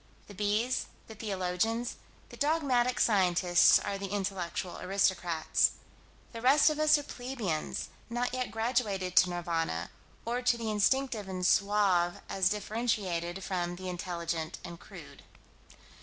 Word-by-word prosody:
The 205 Hz, -, -12 dB
bees, 210 Hz, +5 st, 0 dB, 0.2 s
the 220 Hz, -, -10 dB
theologians, 210 Hz, +3 st, -2 dB, 0.3 s
the -, -, -11 dB
dogmatic 275 Hz, -5 st, +1 dB
scientists 180 Hz, -4 st, +5 dB
are 200 Hz, -1 st, -3 dB
the 195 Hz, -, -4 dB
intellectual 190 Hz, -3 st, -3 dB
aristocrats. 180 Hz, -4 st, +1 dB, 0.6 s
The 230 Hz, -, -7 dB
rest 280 Hz, +5 st, +5 dB
of 305 Hz, -, -4 dB
us 310 Hz, 0 st, +5 dB
are 290 Hz, -, -4 dB
plebeians, 245 Hz, -, -4 dB, 0.2 s
not 245 Hz, +1 st, -2 dB
yet 255 Hz, -1 st, -2 dB
graduated 220 Hz, -6 st, -1 dB
to 185 Hz, -, +7 dB
Nirvana, 165 Hz, -, -2 dB, 0.3 s
or 240 Hz, +2 st, -1 dB
to 245 Hz, -1 st, +2 dB
the 225 Hz, -2 st, -3 dB
instinctive 215 Hz, 0 st, +1 dB
and 185 Hz, -1 st, -3 dB
suave 195 Hz, -3 st, +3 dB
as 190 Hz, -1 st, +2 dB
differentiated 200 Hz, -5 st, -2 dB
from 175 Hz, -2 st, -2 dB
the 185 Hz, +1 st, -6 dB
intelligent 170 Hz, -3 st, -4 dB
and 170 Hz, -1 st, -8 dB
crude. -, -, -12 dB
200 Hz, 130 wpm, -30 LUFS, 180-235 Hz, 0.6 s, to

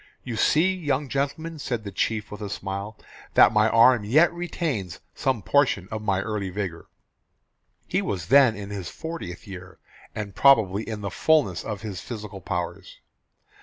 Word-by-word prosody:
"You 120 Hz, -, -5 dB
see, 160 Hz, -, +3 dB
young 145 Hz, -6 st, -2 dB
gentlemen," 150 Hz, +4 st, -3 dB
said 120 Hz, -6 st, -3 dB
the 100 Hz, -, -6 dB
chief 110 Hz, +3 st, -2 dB
with 105 Hz, +1 st, -8 dB
a 105 Hz, -, -4 dB
smile, 100 Hz, +2 st, -5 dB, 0.4 s
"that -, -, +7 dB
my 105 Hz, 0 st, +4 dB
arm 115 Hz, 0 st, +5 dB
yet 155 Hz, +12 st, +4 dB
retains 160 Hz, -, -3 dB
some 130 Hz, -6 st, -1 dB
portion 125 Hz, -7 st, +2 dB
of 110 Hz, 0 st, -4 dB
my 100 Hz, -2 st, 0 dB
early 105 Hz, -2 st, -3 dB
vigour." 90 Hz, -3 st, -5 dB, 1.0 s
He -, -, 0 dB
was 90 Hz, -5 st, -3 dB
then 135 Hz, -5 st, +6 dB
in 100 Hz, -1 st, -7 dB
his 95 Hz, -4 st, -5 dB
fortieth 160 Hz, -, -7 dB
year 95 Hz, -2 st, -10 dB, 0.4 s
and 105 Hz, -2 st, -5 dB
probably 110 Hz, -6 st, +4 dB
in 110 Hz, -2 st, -5 dB
the 100 Hz, -1 st, -4 dB
fullness 145 Hz, -, +2 dB
of 105 Hz, -3 st, -5 dB
his 100 Hz, -5 st, -5 dB
physical 105 Hz, -4 st, -7 dB
powers. 90 Hz, 0 st, -5 dB
110 Hz, 165 wpm, -25 LUFS, 100-135 Hz, 1.0 s, that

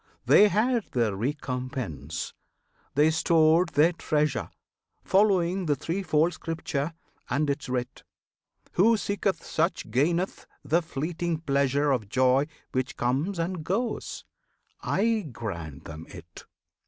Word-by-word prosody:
They 210 Hz, -, +7 dB
had 225 Hz, +3 st, +1 dB
their 115 Hz, -5 st, +1 dB
recompense! 125 Hz, -, -4 dB, 0.6 s
they 150 Hz, +3 st, +5 dB
stored 165 Hz, +1 st, +4 dB
their 160 Hz, +2 st, +4 dB
treasure, 150 Hz, -6 st, 0 dB, 0.5 s
Following 190 Hz, -2 st, +2 dB
the 145 Hz, -, +3 dB
threefold 165 Hz, +1 st, 0 dB
Scripture 160 Hz, -1 st, -3 dB, 0.3 s
and 145 Hz, +2 st, +1 dB
its 140 Hz, -2 st, -4 dB
writ; 125 Hz, -1 st, -3 dB, 0.7 s
Who 220 Hz, +5 st, +4 dB
seeketh 200 Hz, -4 st, -1 dB
such 165 Hz, -, -1 dB
gaineth 170 Hz, -, 0 dB, 0.2 s
the 160 Hz, +5 st, +3 dB
fleeting 165 Hz, +1 st, -3 dB
pleasure 140 Hz, -1 st, +2 dB
Of 110 Hz, -7 st, -1 dB
joy 130 Hz, +4 st, +3 dB, 0.2 s
which 130 Hz, -1 st, -2 dB
comes 140 Hz, +11 st, 0 dB
and 170 Hz, 0 st, -2 dB
goes! 230 Hz, +9 st, -2 dB, 0.6 s
I 220 Hz, -5 st, 0 dB
grant 85 Hz, -, -6 dB
them 80 Hz, 0 st, -9 dB
it! 85 Hz, -3 st, -12 dB
155 Hz, 115 wpm, -27 LUFS, 130-175 Hz, 0.7 s, They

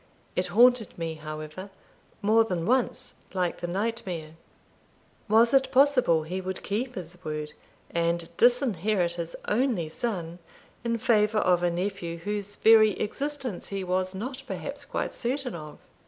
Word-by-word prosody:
It 180 Hz, -, 0 dB
haunted 240 Hz, -1 st, +4 dB
me, 165 Hz, -1 st, -3 dB
however, 155 Hz, +4 st, -7 dB, 0.5 s
more 220 Hz, +2 st, +5 dB
than 180 Hz, -6 st, -2 dB
once, 250 Hz, +2 st, 0 dB, 0.2 s
like 180 Hz, -2 st, -1 dB
the 175 Hz, -, -2 dB
nightmare. 185 Hz, -5 st, -3 dB, 1.0 s
Was 230 Hz, +3 st, +5 dB
it 270 Hz, -1 st, +4 dB
possible 255 Hz, -, +4 dB
he 180 Hz, +4 st, -4 dB
would 185 Hz, 0 st, -5 dB
keep 245 Hz, +5 st, -2 dB
his 180 Hz, -1 st, -8 dB
word, 150 Hz, -1 st, -4 dB, 0.4 s
and 170 Hz, 0 st, -1 dB
disinherit 215 Hz, -, +3 dB
his 170 Hz, -1 st, -5 dB
only 215 Hz, -, +1 dB
son 175 Hz, -3 st, -4 dB, 0.4 s
in 230 Hz, -1 st, 0 dB
favour 220 Hz, -2 st, +3 dB
of 180 Hz, -4 st, +3 dB
a 175 Hz, -, +2 dB
nephew 175 Hz, -1 st, -3 dB
whose 205 Hz, +3 st, -4 dB
very 220 Hz, -2 st, +6 dB
existence 270 Hz, -1 st, -3 dB
he 195 Hz, -1 st, -3 dB
was 185 Hz, +1 st, -1 dB
not 255 Hz, +7 st, -5 dB
perhaps -, -, -6 dB
quite -, -, -3 dB
certain 255 Hz, +1 st, -2 dB
of? 150 Hz, -3 st, -8 dB
195 Hz, 140 wpm, -27 LUFS, 170-230 Hz, 1.0 s, very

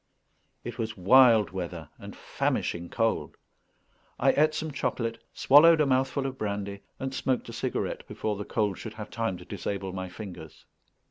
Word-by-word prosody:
It -, -, -7 dB
was 110 Hz, -2 st, -3 dB
wild 115 Hz, +2 st, +6 dB
weather 85 Hz, -4 st, -5 dB
and -, -, -9 dB
famishing 85 Hz, 0 st, -2 dB
cold. 115 Hz, -1 st, -1 dB, 0.8 s
I -, -, +5 dB
ate 155 Hz, +1 st, +3 dB
some 160 Hz, 0 st, -3 dB
chocolate, 115 Hz, -4 st, -3 dB
swallowed 160 Hz, +4 st, +6 dB
a 150 Hz, -, +4 dB
mouthful 135 Hz, +1 st, +1 dB
of 130 Hz, -1 st, -4 dB
brandy, 100 Hz, -1 st, -3 dB, 0.2 s
and 135 Hz, 0 st, -3 dB
smoked 130 Hz, -2 st, -1 dB
a -, -, -7 dB
cigarette 125 Hz, +2 st, -3 dB
before 105 Hz, -1 st, -3 dB
the 100 Hz, -, -5 dB
cold 105 Hz, -3 st, -1 dB
should 110 Hz, -1 st, -7 dB
have 105 Hz, -1 st, -8 dB
time 115 Hz, -5 st, -2 dB
to 90 Hz, -, -12 dB
disable 100 Hz, -1 st, -4 dB
my 95 Hz, -1 st, -5 dB
fingers. 85 Hz, -6 st, -10 dB
110 Hz, 160 wpm, -28 LUFS, 95-130 Hz, 0.8 s, wild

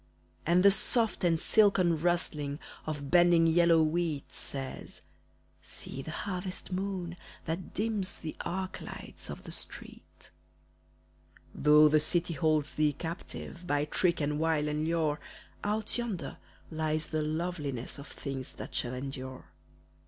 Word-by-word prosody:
And 175 Hz, +2 st, +5 dB
the 200 Hz, -, +8 dB
soft 225 Hz, 0 st, +3 dB
and 165 Hz, -2 st, +3 dB
silken 185 Hz, -6 st, +4 dB
rustling 155 Hz, -5 st, 0 dB, 0.3 s
Of 145 Hz, -3 st, -4 dB
bending 175 Hz, -1 st, +6 dB
yellow 165 Hz, 0 st, +5 dB
wheat 155 Hz, -2 st, -1 dB
Says, 135 Hz, -1 st, -6 dB, 0.6 s
"See 135 Hz, -, -6 dB
the 145 Hz, -, -7 dB
harvest 185 Hz, +2 st, -4 dB
moon 185 Hz, -2 st, -3 dB, 0.3 s
that 165 Hz, +3 st, -4 dB
dims 210 Hz, -2 st, 0 dB
The 155 Hz, -, -6 dB
arc 185 Hz, +1 st, -3 dB
lights -, -, -5 dB
of -, -, -7 dB
the -, -, -8 dB
street." -, -, -9 dB, 1.2 s
Though 150 Hz, +1 st, +7 dB
the 155 Hz, 0 st, +5 dB
city 170 Hz, +3 st, 0 dB
holds 155 Hz, -2 st, +1 dB
thee 150 Hz, -1 st, +2 dB
captive 170 Hz, +2 st, -6 dB
By 145 Hz, -1 st, +2 dB
trick, 170 Hz, +3 st, +1 dB
and 150 Hz, 0 st, 0 dB
wile, 160 Hz, -2 st, +2 dB
and 150 Hz, +1 st, -1 dB
lure, 160 Hz, -2 st, +1 dB, 0.4 s
Out 215 Hz, +3 st, -1 dB
yonder 195 Hz, -12 st, -4 dB, 0.3 s
lies 155 Hz, -1 st, 0 dB
the 155 Hz, 0 st, -1 dB
loveliness 150 Hz, -5 st, -3 dB
Of 140 Hz, -, -9 dB
things 135 Hz, -3 st, -5 dB
that -, -, -8 dB
shall 125 Hz, 0 st, -1 dB
endure. 130 Hz, 0 st, -6 dB
160 Hz, 135 wpm, -31 LUFS, 150-180 Hz, 1.2 s, the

